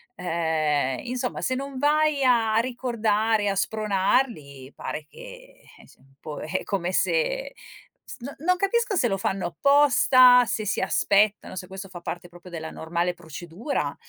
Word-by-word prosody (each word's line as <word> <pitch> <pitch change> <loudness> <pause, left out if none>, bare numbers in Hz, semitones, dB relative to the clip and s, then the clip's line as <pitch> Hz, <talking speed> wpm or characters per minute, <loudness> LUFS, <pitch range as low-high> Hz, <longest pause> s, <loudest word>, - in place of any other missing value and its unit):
ehm, 155 - 0
insomma 250 0 -3
se 255 - 0
non 275 0 -5
vai 300 0 +2
a 230 -4 +3
ricordare, 225 -4 0
a 195 - -1
spronarli 195 - -1
pare 150 0 -6
che, - - -21 0.5
ehm, - - -19
insom 130 - -21
un 135 - -26
po' 150 -1 -7
è 170 +5 -3
come 185 -2 -2
se - - 0 0.5
s - - -9
no 265 +4 -7
non 365 +5 +2
capisco 425 +3 0
se 255 - +2
lo 195 - -1
fanno 190 -1 -2
apposta, 255 - +5
se 215 -1 -3
si 210 - -1
aspettano 200 -1 +1
se 180 - -6
questo 195 0 -8
fa 180 -1 -9
parte 175 +1 -6
proprio 175 +1 -14
della 160 -2 -6
normale 170 +2 -2
procedura. 175 - -5
210 Hz, 160 wpm, -25 LUFS, 175-255 Hz, 0.5 s, apposta